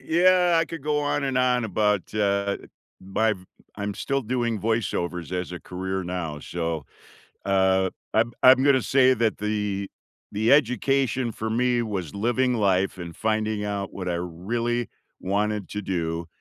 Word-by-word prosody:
Yeah. 180 +1 +4
I 165 - +1
could 165 -2 -8
go 150 0 0
on 145 -1 0
and 135 -2 -1
on 125 -2 +2
about, 105 -1 0
uh, 100 -1 +1 0.4
my 105 +3 +1 0.4
I'm 100 0 -3
still 135 +5 -1
doing 120 -2 -1
voiceovers 90 -6 -1
as 90 0 -3
a 90 - -6
career 95 +1 -4
now. 85 -4 -4
So, 80 -3 -3 0.6
uh, 95 -1 +3 0.2
I'm 115 +2 +2
I'm 130 +1 +8
gonna 135 -2 +4
say 130 -1 +4
that 110 -1 +1
the 105 -2 -2 0.4
the 110 +5 +3
education 130 -2 +2
for 110 +1 -4
me 120 +1 +2
was 95 -8 -4
living 120 +5 +1
life 95 -3 +1
and 85 -1 -7
finding 110 -1 -1
out 100 -1 -3
what 95 -2 -5
I 85 - 0
really 115 +8 -2 0.3
wanted 105 +1 -1
to 105 - -4
do, 85 -3 -2
105 Hz, 155 wpm, -25 LUFS, 95-125 Hz, 0.6 s, I'm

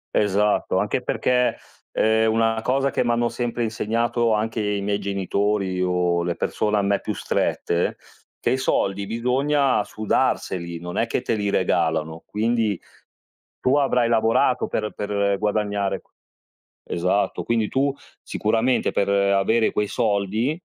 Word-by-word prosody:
Esatto. 105 0 +2
Anche - - 0
perché, 125 -2 +1 0.3
ehm, 110 0 +2
una 115 0 +1
cosa 135 +3 +1
che - - 0
m'hanno 120 0 +1
sempre 120 -1 -2
insegnato, 115 +1 0
anche 110 +1 -1
i 105 -1 -1
miei 100 0 -1
genitori 100 -1 -1
o 90 -1 +1
le 85 0 -1
persone 105 0 0
a 100 - +1
me 100 0 +1
più - - -4
strette, 85 +1 -1 0.4
che - - 0
i 130 - +2
soldi 100 -6 0
bisogna 130 +3 +1
sudarseli, 90 -5 -1
non 90 +3 -6
è 115 - +1
che 120 - -2
te 115 - 0
li 105 -2 -1
regalano. 80 -3 0
Quindi, 110 -2 0 0.8
tu 130 +3 +2
avrai 125 -4 +2
lavorato 115 +2 +2
per 105 -1 -3
per 100 -1 0
guadagnare 105 -1 -1
q - - -36 0.8
esatto. 90 +4 0
Quindi, 115 -2 0
tu, 140 +1 +1 0.3
sicuramente, 115 +4 0
per 100 - 0
avere 100 +3 +2
quei 105 -1 0
soldi, 110 +7 0
105 Hz, 140 wpm, -23 LUFS, 100-115 Hz, 0.8 s, Esatto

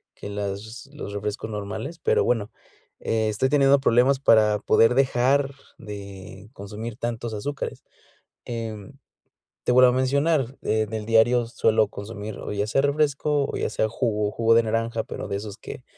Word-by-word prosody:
que 100 - -8
las 105 +5 -5
los 125 -8 -7
refrescos 105 +2 -4
normales, 110 +10 -5
pero, - - +3
bueno, 110 -4 0 0.5
estoy 110 +3 0
teniendo 140 -1 +5
problemas 130 +2 +3
para 110 -5 +4
poder 115 +3 +4
dejar 135 +1 +2 0.2
de 100 -1 -10
consumir 105 +2 -7
tantos 120 -1 -4
azúcares, 135 +7 -5 0.6
em, 110 -4 -6 0.7
te - - +2
vuelvo 125 0 +7
a - - -2
mencionar, 135 0 +1
eh, 110 0 +1
del 110 -1 -4
diario 115 +2 +4
suelo 110 -2 +2
consumir, 105 0 -7
o - - -6
ya 105 +1 -1
sea 135 - +2
refresco 145 0 +1
o - - -4
ya - - -1
sea 110 0 0
jugo 105 -3 -1
jugo 115 0 +3
de 115 - +5
naranja, 115 0 -1
pero - - -7
de 100 - -2
esos 105 +1 -7
que 125 - -9
115 Hz, 160 wpm, -24 LUFS, 105-130 Hz, 0.7 s, vuelvo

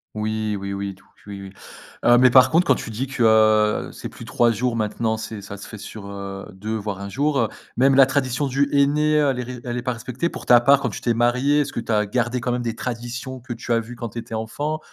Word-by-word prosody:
Oui, 110 -1 -2
oui, 100 0 -4
oui, 100 0 -4
tout 100 +1 -22 0.2
q 105 - -14
oui, 100 -1 -7
oui, 95 - -8 0.5
heu, 120 0 +6
mais 130 +1 +6
par 130 +1 +7
contre, 175 +2 +3
quand - - +5
tu - - -6
dis 115 +5 -3
que, 130 -3 -1
heu, 110 -1 +4
c'est - - -7
plus - - -11
3 120 -1 +2
jours 120 +2 -1
maintenant, 110 0 -1
c'est 110 -1 -6
ça 100 +1 -8
se 100 - -10
fait 110 - -9
sur, 105 0 -9
heu, 100 -1 -7
2, 105 +3 -5
voire 100 -2 -4
1 100 - -6
jour, 140 +6 0
heu, 115 - +2 0.3
même 135 +2 +4
la 135 -1 +8
tradition 135 0 0
du 140 +2 +1
henné, 150 +2 +3
heu, 145 - +3
elle 130 - -1
est 125 - -2
ré 125 0 -7
elle 120 0 -4
est 125 - -2
pas 125 0 -2
respectée? 125 +7 -3
Pour - - -8
ta 120 -1 +7
part 135 +3 +4
quand 125 - -1
tu 105 - -6
t'es 120 - 0
mariée, 125 +5 +2
est-ce 145 - -3
que - - -4
tu 115 -1 -2
as 105 0 +2
gardé 125 +3 -1
quand 125 - -1
même 125 0 -1
des 115 -2 -3
traditions 125 +2 -5
que 120 0 -6
tu 120 +1 -7
as 115 - +4
vu 115 +2 -8
quand 120 0 -5
tu 115 - -6
étais 115 -1 -7
enfant, 145 +8 -3
120 Hz, 275 wpm, -22 LUFS, 110-130 Hz, 0.5 s, la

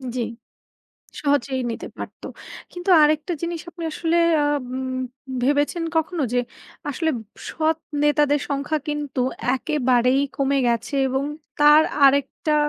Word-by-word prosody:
জি। 250 - -1 1.0
সহজেই 280 -2 +1
নিতে - - -5
পারত। - - -8 0.5
কিন্তু 355 +2 -3
আরেকটা 305 +3 +2
জিনিস 335 -1 -3
আপনি 335 -1 -8
আসলে 330 +1 0 0.3
আ - - +2 0.3
উম 260 0 -3 0.5
ভেবেছেন 290 +5 +1
কখনো 320 0 0
যে, 250 - +2 0.5
আসলে 320 +3 0 0.4
সৎ 315 0 +1 0.3
নেতাদের 295 -1 +3
সংখ্যা 285 +2 -1
কিন্তু 295 -3 -3 0.3
একেবারেই 255 -1 +2 0.2
কমে 275 0 +1
গেছে 235 +4 -1
এবং 265 +2 -1 0.3
তার 295 +1 +7 0.2
আরেকটা 280 +2 +3
290 Hz, 120 wpm, -22 LUFS, 265-310 Hz, 1.0 s, তার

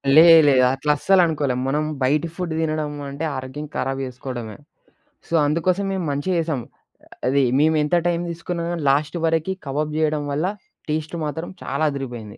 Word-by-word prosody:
లేదు, 165 0 +9
లేదు. 130 -2 +5
అట్లా 150 +3 0
అస్సలనుకోలేం, 155 -9 +2
మనం 150 +3 0 0.2
బయటి 150 +5 +2
ఫుడ్ 180 -3 -3
తినడం 155 -2 -1 0.2
అంటే 140 +4 -6
ఆరోగ్యం 130 +3 -6
ఖరాబ్ 135 +1 -1
చేసుకోవడమే. 125 -3 -7 0.7
సో, 170 - -4
అందుకోసం 175 +6 +1
మేం 190 -2 -2
మంచిగా 145 +7 -1
చేసాం. 155 -6 -2 0.7
అది 140 +2 +3 0.2
మేము 160 +1 +3
ఎంత 150 +4 +1
టైం 170 0 0
తీసుకున్నా, 170 0 -4
గాని 165 -3 -3
లాస్ట్ 145 +5 +1
వరకి 165 +3 +1
కబాబ్ 150 +3 -2
చేయడం 155 -1 +1
వల్ల 150 +5 0 0.4
టేస్ట్ 155 +2 -2
మాత్రం, 160 +3 -4
చాలా 140 +3 -2
అదిదిరిపోయింది. 120 -7 -6
150 Hz, 155 wpm, -22 LUFS, 135-165 Hz, 0.7 s, లేదు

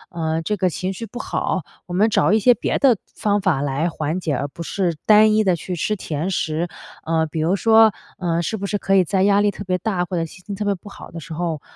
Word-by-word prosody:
嗯， 160 -1 -1
这 210 +5 -1
个 185 -1 +2
情 185 +2 -3
绪 230 +5 -6
不 245 - -10
好， 190 - -2 0.2
我 175 - -8
们 205 +5 +3
找 210 - +3
一 220 - +4
些 245 +4 +6
别 - - -1
的 260 -6 +4 0.2
方 205 -1 +1
法 185 -8 +1
来 145 +4 0
缓 160 +1 -3
解， 160 -5 -1
而 140 +3 -2
不 145 - -11
是 175 -1 -1
单 215 0 +6
一 215 0 +3
地 185 -3 +2
去 180 +2 -5
吃 210 +5 -1
甜 160 -2 -3
食。 165 -2 -1 0.4
呃， 160 0 +1
比 155 +1 -5
如 165 +5 +2
说， 220 +1 +5 0.2
呃， 170 -2 -1
是 220 +6 -2
不 200 - -4
是 205 +1 -1
可 195 0 +1
以 190 - +5
在 190 +2 +1
压 200 0 +4
力 205 - +3
特 - - -8
别 185 0 0
大， 185 -1 -1
或 180 0 -4
者 165 - 0
心 180 +3 -14
情 205 - -5
特 210 +1 -4
别 200 -1 +1
不 195 +3 -13
好 - - -11
的 165 - -7
时 160 +1 -9
候， 165 -2 -3
185 Hz, 285 characters per minute, -21 LUFS, 165-205 Hz, 0.4 s, 些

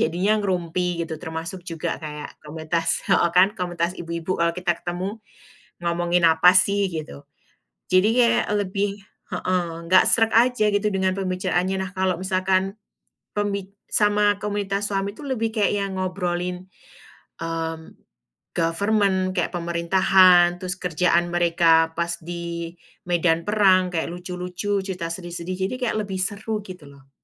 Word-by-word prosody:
jadinya 190 +5 +1
ngerumpi, 180 -2 -1
gitu, 165 -1 -3
termasuk 165 +2 -6
juga 165 -3 -3
kayak 150 -1 -7
komunitas 160 +2 -1
heeh 170 - +3
kan, 185 +3 +4
komunitas 175 -1 -2
ibu-ibu 170 +1 -4
kalau 170 0 +2
kita 180 0 -1
ketemu, 185 +5 -5 0.6
ngomongin 175 0 +1
apa 160 +2 +6
sih, 200 +2 +3
gitu. 150 - -6 0.7
Jadi 185 +3 +4
kayak 235 - +3
lebih 200 0 -1 0.3
heeh, 180 0 0 0.2
enggak 185 +2 +6
sreg 225 -1 +4
aja 240 -2 +4
gitu 205 +1 0
dengan 190 -1 +1
pembicaraannya. 185 0 -1
Nah 190 - -5
kalau 185 -1 +1
misalkan, 190 +1 0 0.6
pembi 200 -2 -2 0.2
sama 205 -1 +2
komunitas 205 -1 -2
suami 195 0 -1
tu - - -14
lebih 235 -5 -2
kayak 205 -2 +1
yang 195 -1 -5
ngobrolin, 180 -1 -3 0.8
mmm, 165 -1 -4 0.6
government, 190 +2 +1
kayak 175 - 0
pemerintahan, 175 +1 +4
terus 185 +1 -3
kerjaan 175 0 +1
mereka 165 -1 +3
pas 170 0 -1
di 170 0 -5 0.4
medan 170 -1 +2
perang, 190 -3 +4
kayak 165 - -1
lucu-lucu, 180 +3 -3
cerita 180 -4 -4
sedih-sedih, 175 +1 -5
jadi 255 - -4
kayak 215 -3 -1
lebih 190 -2 -5
seru 210 +2 -2
gitu 185 -6 -11
loh. 135 -1 -19
180 Hz, 135 wpm, -23 LUFS, 170-195 Hz, 0.8 s, apa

